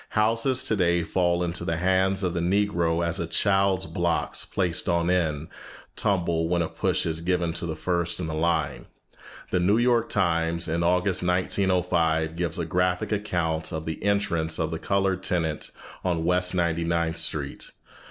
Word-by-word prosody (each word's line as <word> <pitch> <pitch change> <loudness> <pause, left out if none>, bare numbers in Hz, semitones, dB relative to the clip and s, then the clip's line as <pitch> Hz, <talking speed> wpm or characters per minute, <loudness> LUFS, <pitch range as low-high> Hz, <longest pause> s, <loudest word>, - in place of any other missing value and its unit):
Houses 115 +4 +2
today 85 -5 +1
fall 90 0 +1
into 85 0 -3
the 80 0 -1
hands 95 +2 +1
of 90 -2 0
the 85 - -1
Negro 85 -2 +1
as 85 0 -1
a 85 - -2
child's 95 +2 +2
blocks, 85 +1 -1
placed 90 -2 0
on 85 0 +2
end, 80 -4 0 0.5
tumble 85 -4 +1
when 85 -1 +2
a - - -2
push - - -1
is 80 -1 -2
given 85 -1 0
to 85 - -4
the 80 - -3
first 85 +1 -1
in 90 - -2
the 80 - -4
line. 80 -2 -1 0.6
The 90 - +2
New 100 +5 +3
York 120 -1 +2
Times, 85 -3 +1
in 80 +1 -1
August, 90 +2 +2
1905, 90 -3 +1
gives 85 -1 -2
a 85 - -2
graphic 90 +3 0
account 85 -6 -1
of 80 -1 -4
the 80 - -5
entrance 85 -6 +1
of 80 0 -1
the 80 - -3
colored 95 -1 0
tenant 85 -5 -1 0.3
on 85 -3 0
West 90 +1 +1
Ninety 85 -1 +1
ninth 85 0 0
Street. 75 -4 -3
85 Hz, 170 wpm, -25 LUFS, 80-95 Hz, 0.6 s, New